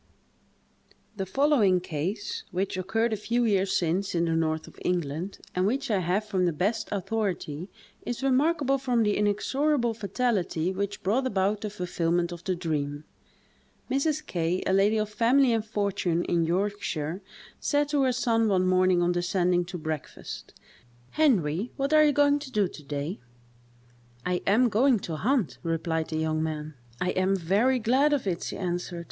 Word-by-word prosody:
The 195 -2 -4
following 230 -6 +3
case, 180 +5 -4
which 185 +2 -2
occurred 225 +5 0
a - - +2
few 235 +3 0
years 195 -3 +2
since 180 +3 -1
in 170 0 +2
the 165 - 0
north 160 -1 0
of - - -15
England, 175 +1 -2 0.2
and 185 +1 +1
which 270 +3 -1
I 200 - +2
have 185 +4 0
from 190 -4 0
the - - +2
best 195 +8 -1
authority, 195 -5 -2 0.3
is 245 +2 -4
remarkable 275 +1 +2
from 250 -3 +1
the 210 -1 +1
inexorable 240 +5 +1
fatality 200 -5 -1
which 200 +1 -4
brought 245 +8 +1
about 200 -1 0
the 215 - -3
fulfilment 175 -3 -1
of 175 0 -8
the 185 - 0
dream: 150 -4 -3 0.9
Mrs. 300 +3 0
K——, 175 +1 -1
a 190 - +1
lady 200 +3 +3
of 215 0 0
family 240 +4 +3
and 225 -1 +1
fortune 200 -5 -1
in 170 -1 +1
Yorkshire, 180 -3 -2 0.4
said 290 0 +1
to 290 -1 +2
her 260 -1 +3
son, 230 -2 +1
one 185 -3 +2
morning 185 -1 +3
on 175 - +2
descending 175 0 +1
to 180 +1 -6
breakfast: 155 -2 -6 0.6
"Henry, 215 - +2
what 275 +2 0
are 305 0 +7
you 300 - +5
going 290 0 +3
to 285 -2 -8
do 205 -4 +2
to 155 - -12
day?" 145 +6 -4 1.1
"I 180 0 0
am 230 +5 +5
going 245 +3 +3
to 160 -2 -4
hunt," 245 - 0
replied 165 -1 -1
the 155 - -2
young 155 0 0
man. 155 -1 -3 0.3
"I 180 - 0
am 185 +1 +1
very 200 +9 +2
glad 260 +6 +3
of 280 -6 0
it," 175 -3 -1
she - - -4
answered. 175 -1 -3
195 Hz, 170 wpm, -27 LUFS, 175-235 Hz, 1.1 s, are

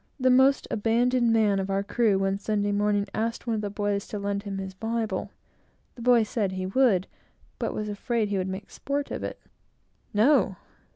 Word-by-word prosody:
The 255 0 +4
most 265 +2 +4
abandoned 235 +2 +2
man 215 -3 +3
of 190 0 -3
our 195 0 0
crew, 210 -1 +2
one 195 0 0
Sunday 205 0 0
morning, 205 0 +1
asked 230 +1 -2
one 235 - -1
of 215 - -1
the 205 - -3
boys 205 0 -2
to 210 - -5
lend 200 0 -2
him 200 -1 -5
his 190 -1 -5
Bible. 225 +2 -2 0.6
The 240 - -12
boy 240 -1 +5
said 210 -3 -1
he 185 0 -3
would, 195 -2 +3 0.5
but - - -1
was 215 - -3
afraid 215 +1 -1
he 200 -1 0
would 185 - -2
make 190 +1 -6
sport 280 0 -3
of - - -4
it. - - -5 0.7
"No!" 235 +9 +3
210 Hz, 190 wpm, -26 LUFS, 200-235 Hz, 0.7 s, boy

